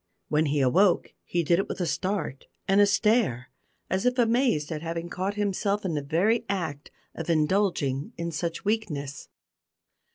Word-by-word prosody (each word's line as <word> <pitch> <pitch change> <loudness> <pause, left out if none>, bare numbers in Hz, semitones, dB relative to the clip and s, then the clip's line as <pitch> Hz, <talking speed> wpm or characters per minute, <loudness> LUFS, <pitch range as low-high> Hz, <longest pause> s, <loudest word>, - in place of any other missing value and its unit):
When 155 +1 +2
he 145 0 +1
awoke 175 +9 +3
he 175 -1 0
did 170 +3 +3
it 195 - -2
with - - -4
a 180 - 0
start 185 -6 -2 0.2
and 195 +1 +5
a 205 - +6
stare, 200 - +2 0.4
as 190 0 -1
if 250 +1 +1
amazed 235 - +2
at 155 -1 -3
having 165 +1 -4
caught 190 +3 -2
himself 205 0 -1
in 175 - -1
the 150 - -1
very 175 +12 +1
act 160 -7 -3 0.2
of 165 0 -6
indulging 155 -4 +1
in 170 0 -3
such 165 +3 -3
weakness. 150 -11 -2
175 Hz, 165 wpm, -27 LUFS, 150-205 Hz, 0.4 s, a